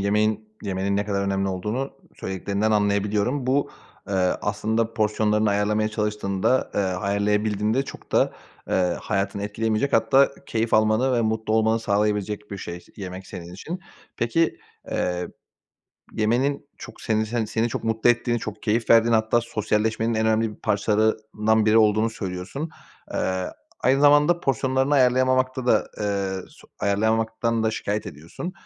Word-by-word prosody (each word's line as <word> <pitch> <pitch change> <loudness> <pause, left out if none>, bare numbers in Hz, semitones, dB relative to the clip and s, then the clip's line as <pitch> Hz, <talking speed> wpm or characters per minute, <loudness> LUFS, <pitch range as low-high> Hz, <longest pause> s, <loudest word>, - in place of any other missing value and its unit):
yemeğin 105 +1 +1
yemenin 100 0 -1
ne 100 - 0
kadar 100 -1 -1
önemli 100 0 0
olduğunu 105 +9 -3 0.2
söylediklerinden 100 +3 -2
anlayabiliyorum. 105 +5 +1
Bu, 140 +2 +1 0.4
eee, 100 - -2 0.3
aslında 110 +2 -1
porsiyonlarını 105 0 +2
ayarlamaya 105 +1 +1
çalıştığında, 105 +2 0
eee, - - +2
ayarlayabildiğinde 105 +4 0
çok - - -11
da, - - +3 0.4
eee, - - 0 0.3
hayatını 100 +1 -2
etkileyemeyecek, 110 +5 -1
hatta 125 +5 +4 0.2
keyif 115 0 0
almanı 110 +4 +3
ve 120 - +2
mutlu 110 -1 -1
olmanı 110 0 +2
sağlayabilecek 105 -1 -1
bir 100 - -5
şey, 90 -1 -7
yemek 95 -1 -7
senin 85 0 -9
için. 170 - -6 0.4
Peki, 160 +8 +1 0.3
eee, 90 0 -1 0.8
yemenin 130 +7 0
çok - - -11
senin 110 0 0
sen 115 +1 -1
seni 110 +2 0
çok 115 - -4
mutlu 110 +1 +3
ettiğini, 120 0 0
çok 110 -2 -7
keyif 115 +2 0
verdiğini, 115 0 +6
hatta 110 +1 +3
sosyalleşmenin 110 0 0
en 110 0 +1
önemli 110 0 +2
bir 105 - -12
parçalarından 110 +1 +1
biri 110 +1 +5
olduğunu 110 +1 +3
söylüyorsun. 100 - -5 0.4
Eee, 95 -1 -1 0.3
aynı 135 +2 +3
zamanda 145 +4 +5
porsiyonlarını 130 0 +1
ayarlayamamakta 130 0 +2
da, 110 -3 +3
eee, 100 -2 -1
su - - -19
ayarlayamamaktan 110 +2 +1
da 110 - +2
şikâyet 105 -1 -3
ediyorsun. 85 - -7
110 Hz, 140 wpm, -24 LUFS, 100-115 Hz, 0.8 s, verdiğini